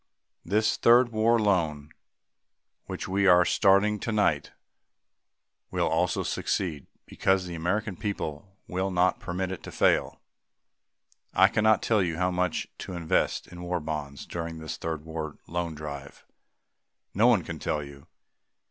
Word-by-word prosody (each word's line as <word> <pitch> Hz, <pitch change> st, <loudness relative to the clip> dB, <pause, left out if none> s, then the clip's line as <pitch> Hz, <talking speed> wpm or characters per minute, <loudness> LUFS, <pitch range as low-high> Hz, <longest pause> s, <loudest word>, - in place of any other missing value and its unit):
This 105 Hz, +5 st, +1 dB
Third 120 Hz, +1 st, +5 dB
War 115 Hz, +1 st, +3 dB
Loan, 80 Hz, -8 st, 0 dB, 1.0 s
which -, -, -5 dB
we 100 Hz, +1 st, +2 dB
are 90 Hz, -1 st, +6 dB
starting 100 Hz, +2 st, +3 dB
tonight, 100 Hz, -11 st, 0 dB, 1.2 s
will -, -, 0 dB
also -, -, +1 dB
succeed 80 Hz, -7 st, -2 dB, 0.2 s
because 95 Hz, -1 st, +1 dB
the 90 Hz, -, -6 dB
American 95 Hz, +5 st, -1 dB
people 95 Hz, -4 st, -4 dB, 0.2 s
will 95 Hz, +2 st, -1 dB
not 90 Hz, 0 st, +2 dB
permit 90 Hz, +1 st, -3 dB
it 95 Hz, -, -6 dB
to -, -, -9 dB
fail. -, -, +2 dB, 1.2 s
I 95 Hz, +1 st, +6 dB
cannot 110 Hz, 0 st, +3 dB
tell 110 Hz, -3 st, +3 dB
you 85 Hz, -3 st, -1 dB
how 90 Hz, +1 st, +1 dB
much 90 Hz, -1 st, -1 dB
to -, -, -6 dB
invest 85 Hz, -2 st, 0 dB
in 90 Hz, 0 st, -10 dB
War 90 Hz, 0 st, -2 dB
Bonds 75 Hz, -3 st, -5 dB
during 85 Hz, -1 st, -5 dB
this 80 Hz, -1 st, -5 dB
Third 80 Hz, -2 st, -5 dB
War 80 Hz, -2 st, -5 dB
Loan 85 Hz, -1 st, -3 dB
Drive. 70 Hz, -2 st, -8 dB, 0.9 s
No 110 Hz, +5 st, +4 dB
one 110 Hz, -8 st, +4 dB
can -, -, -6 dB
tell 75 Hz, -1 st, -2 dB
you. 70 Hz, +2 st, -13 dB
90 Hz, 140 wpm, -27 LUFS, 80-100 Hz, 1.2 s, are